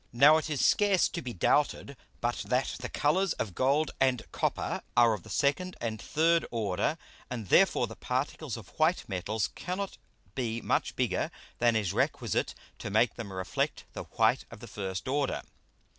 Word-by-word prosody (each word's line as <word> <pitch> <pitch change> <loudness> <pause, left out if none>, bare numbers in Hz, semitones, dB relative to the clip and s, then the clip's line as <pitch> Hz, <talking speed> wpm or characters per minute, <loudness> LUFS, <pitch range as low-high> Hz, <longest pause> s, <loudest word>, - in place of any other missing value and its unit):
Now 140 +6 +7
it 160 - -3
is 145 -4 +1
scarce 200 -3 +4
to 170 - -4
be 125 - -5
doubted 140 +7 +1 0.3
but 120 +1 0
that 125 +1 0
the 125 - -5
Colours 180 +5 +1
of 100 - -4
Gold 140 - +2
and 130 -3 +2
Copper - - -1 0.2
are 115 -2 +6
of 105 - -4
the - - -14
second 165 +6 0
and 110 -2 -3
third 165 +7 +2
order, 110 - -1 0.3
and 115 -6 -5
therefore 190 -10 +5
the 110 -1 -9
Particles 130 +1 -3
of 110 -5 -11
white 160 +3 +2
Metals 100 +2 -1
cannot 185 +2 -5 0.3
be 115 -2 -2
much - - 0
bigger - - 0 0.3
than 120 -1 +3
is 105 -5 0
requisite - - 0 0.2
to - - -5
make - - +3
them 100 - -7
reflect 95 -1 -2
the - - -6
white - - +2
of - - -11
the 120 - -10
first 95 -3 -5
order. 140 +1 0
125 Hz, 175 wpm, -30 LUFS, 110-155 Hz, 0.3 s, Now